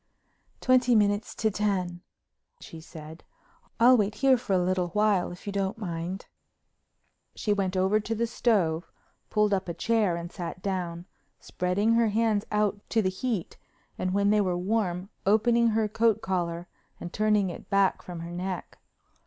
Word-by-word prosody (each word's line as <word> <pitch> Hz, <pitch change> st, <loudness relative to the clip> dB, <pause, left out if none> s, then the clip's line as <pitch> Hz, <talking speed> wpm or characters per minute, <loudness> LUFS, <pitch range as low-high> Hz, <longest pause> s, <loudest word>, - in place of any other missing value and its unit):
"Twenty 255 Hz, -1 st, +4 dB
minutes 205 Hz, 0 st, +1 dB
to 220 Hz, -1 st, 0 dB
ten," 185 Hz, -4 st, -1 dB, 0.6 s
she 165 Hz, -, -10 dB
said. 160 Hz, 0 st, -11 dB, 0.6 s
"I'll 245 Hz, +2 st, +7 dB
wait 210 Hz, -2 st, +1 dB
here 270 Hz, -1 st, +4 dB
for 235 Hz, -5 st, -3 dB
a -, -, +4 dB
little 180 Hz, 0 st, 0 dB
while 205 Hz, 0 st, +1 dB
if 175 Hz, -, -11 dB
you 200 Hz, -, -4 dB
don't 195 Hz, 0 st, -1 dB
mind." 180 Hz, -2 st, -5 dB, 1.1 s
She 210 Hz, -, 0 dB
went 190 Hz, -2 st, -1 dB
over 190 Hz, +3 st, +3 dB
to 220 Hz, +2 st, -3 dB
the 230 Hz, +2 st, 0 dB
stove, 195 Hz, -8 st, 0 dB, 0.4 s
pulled 210 Hz, -1 st, +2 dB
up 190 Hz, -2 st, -1 dB
a 170 Hz, -, -4 dB
chair 220 Hz, -6 st, +1 dB
and 170 Hz, +1 st, -6 dB
sat 180 Hz, +1 st, -7 dB
down, 175 Hz, -3 st, -3 dB, 0.3 s
spreading 195 Hz, +5 st, 0 dB
her 230 Hz, 0 st, +3 dB
hands 215 Hz, -1 st, +1 dB
out 210 Hz, -1 st, 0 dB
to 225 Hz, -2 st, +2 dB
the 185 Hz, -, +2 dB
heat, 190 Hz, -1 st, -3 dB, 0.4 s
and 185 Hz, -, -2 dB
when 200 Hz, +1 st, +2 dB
they 210 Hz, 0 st, +4 dB
were 180 Hz, -3 st, 0 dB
warm, 185 Hz, -1 st, -1 dB, 0.2 s
opening 235 Hz, +3 st, +4 dB
her 220 Hz, -1 st, +1 dB
coat 220 Hz, 0 st, +2 dB
collar, 175 Hz, -4 st, -2 dB, 0.3 s
and 175 Hz, -, -7 dB
turning 210 Hz, -3 st, +2 dB
it -, -, -11 dB
back 195 Hz, -2 st, +2 dB
from 175 Hz, -2 st, -8 dB
her 170 Hz, +1 st, -7 dB
neck. 180 Hz, +1 st, -5 dB
200 Hz, 165 wpm, -27 LUFS, 180-215 Hz, 1.1 s, I'll